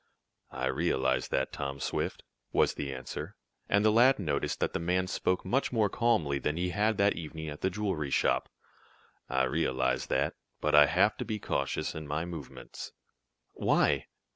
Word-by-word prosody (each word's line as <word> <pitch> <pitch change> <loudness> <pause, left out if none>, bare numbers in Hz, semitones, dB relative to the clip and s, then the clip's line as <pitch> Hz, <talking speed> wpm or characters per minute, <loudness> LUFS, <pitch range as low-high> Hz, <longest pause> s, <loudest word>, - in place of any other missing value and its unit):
"I 65 0 -3
realize 65 0 +1
that, 65 - -1
Tom 70 -1 -4
Swift," - - -2 0.3
was - - +3
the 70 -1 -4
answer, 65 -1 -6 0.3
and 100 +1 +3
the 110 - +6
lad 125 +5 +6
noticed 75 -8 -1
that - - 0
the - - -1
man 90 +2 +1
spoke 90 0 -1
much 135 +3 +1
more 110 -4 +2
calmly 110 - +1
than 75 +3 -1
he 90 +1 0
had 105 +4 +1
that 100 +1 +4
evening 80 -1 -6
at 75 - -8
the 95 - +2
jewelry 95 -7 -2
shop. - - +1 0.8
"I 65 0 +2
realize 65 0 0
that, - - +1 0.3
but 75 - 0
I 75 0 +8
have - - +3
to - - -4
be 110 - -2
cautious 70 -8 -2
in 80 -1 -7
my 75 +3 -2
movements." 80 -6 -8 0.6
"Why?" - - +2
80 Hz, 170 wpm, -30 LUFS, 70-100 Hz, 0.8 s, I